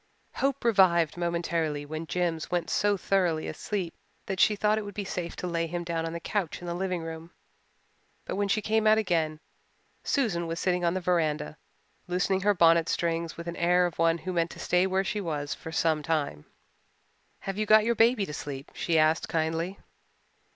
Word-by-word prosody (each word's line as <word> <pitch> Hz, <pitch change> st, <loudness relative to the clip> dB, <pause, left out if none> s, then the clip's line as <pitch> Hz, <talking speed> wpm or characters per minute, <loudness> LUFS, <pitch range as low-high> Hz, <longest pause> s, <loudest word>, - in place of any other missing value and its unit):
Hope 275 Hz, 0 st, -1 dB
revived 185 Hz, -8 st, +4 dB
momentarily 170 Hz, -3 st, -1 dB
when 155 Hz, +2 st, -6 dB
Jims 170 Hz, -3 st, -1 dB
went 175 Hz, -2 st, -1 dB
so 205 Hz, -1 st, +2 dB
thoroughly 180 Hz, -5 st, +1 dB
asleep 190 Hz, -5 st, -3 dB, 0.3 s
that 190 Hz, -2 st, -4 dB
she 210 Hz, -, +5 dB
thought 210 Hz, +1 st, +2 dB
it -, -, -4 dB
would 205 Hz, -1 st, -8 dB
be 205 Hz, -, -3 dB
safe 175 Hz, -3 st, -4 dB
to -, -, -5 dB
lay 170 Hz, -1 st, -1 dB
him 175 Hz, +1 st, -3 dB
down 165 Hz, -1 st, -2 dB
on 165 Hz, -, -5 dB
the 170 Hz, -, -4 dB
couch 190 Hz, -1 st, -2 dB
in 175 Hz, -, -9 dB
the 170 Hz, -, -3 dB
living 180 Hz, -1 st, -2 dB
room. 165 Hz, 0 st, -7 dB, 1.0 s
But -, -, -3 dB
when 200 Hz, +1 st, 0 dB
she 210 Hz, +2 st, 0 dB
came 220 Hz, +1 st, +2 dB
out 215 Hz, 0 st, +6 dB
again 165 Hz, -7 st, 0 dB, 0.6 s
Susan 195 Hz, -, 0 dB
was 165 Hz, +1 st, -3 dB
sitting 180 Hz, -1 st, 0 dB
on 170 Hz, +1 st, +1 dB
the 185 Hz, -, -1 dB
veranda, 155 Hz, -4 st, 0 dB, 0.5 s
loosening 185 Hz, +2 st, 0 dB
her 205 Hz, +1 st, +3 dB
bonnet 165 Hz, -1 st, +5 dB
strings 165 Hz, -1 st, -1 dB
with 170 Hz, -, -7 dB
the 170 Hz, 0 st, -5 dB
air 180 Hz, +1 st, +4 dB
of 175 Hz, -3 st, -4 dB
one 165 Hz, 0 st, +3 dB
who 185 Hz, +2 st, -5 dB
meant 170 Hz, -1 st, +1 dB
to -, -, -11 dB
stay 180 Hz, +1 st, +2 dB
where 190 Hz, 0 st, +1 dB
she 200 Hz, +2 st, -2 dB
was 150 Hz, -5 st, -3 dB
for 160 Hz, -, -8 dB
some 160 Hz, -1 st, +1 dB
time. 150 Hz, -, -2 dB, 1.0 s
"Have 195 Hz, +1 st, -4 dB
you 215 Hz, -, 0 dB
got 215 Hz, 0 st, +6 dB
your 235 Hz, -, +3 dB
baby 225 Hz, -2 st, +3 dB
to 150 Hz, -, -7 dB
sleep?" 140 Hz, -2 st, -6 dB
she 165 Hz, -2 st, 0 dB
asked 155 Hz, +1 st, +3 dB
kindly. 165 Hz, +4 st, -1 dB
175 Hz, 200 wpm, -28 LUFS, 165-195 Hz, 1.0 s, out